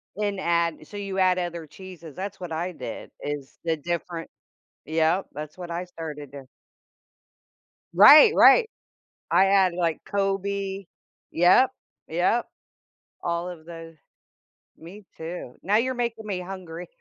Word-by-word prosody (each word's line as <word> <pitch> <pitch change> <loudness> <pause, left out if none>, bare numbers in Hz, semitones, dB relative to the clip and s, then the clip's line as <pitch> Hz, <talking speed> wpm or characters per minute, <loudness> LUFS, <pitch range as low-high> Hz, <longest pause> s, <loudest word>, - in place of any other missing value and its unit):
And 205 -1 -2
add 170 -3 0
so 205 - -12
you 195 -1 -5
add 185 -1 +3
other 175 -2 -4
cheeses, 170 -2 -12
that's 195 +1 -6
what 180 -2 -7
I 170 +3 -2
did - - -8
is 145 -2 -6
the 165 -1 +1
different 170 +1 -4 0.6
Yup, 160 +4 +1
that's 150 +2 -8
what 175 -1 -8
I 170 +1 -3
started 150 -5 -8
to 140 -2 -10 1.5
Right, 290 - +9
right. 455 -2 +7 0.6
I 195 - +5
add, 195 -2 +3
like, 170 -3 0
Colby 195 -1 -2 0.4
yup, 180 +10 +5 0.4
yup. 180 +8 +1 0.8
All 170 +1 -2
of 170 -3 -9
tho 165 -1 -10 0.8
me 190 +6 -12
too, 160 -6 -7
now 200 +4 +2
you're 255 +3 +1
making 235 -3 -3
me 195 -3 -3
hungry. 180 -2 -8
180 Hz, 135 wpm, -25 LUFS, 165-195 Hz, 1.5 s, Right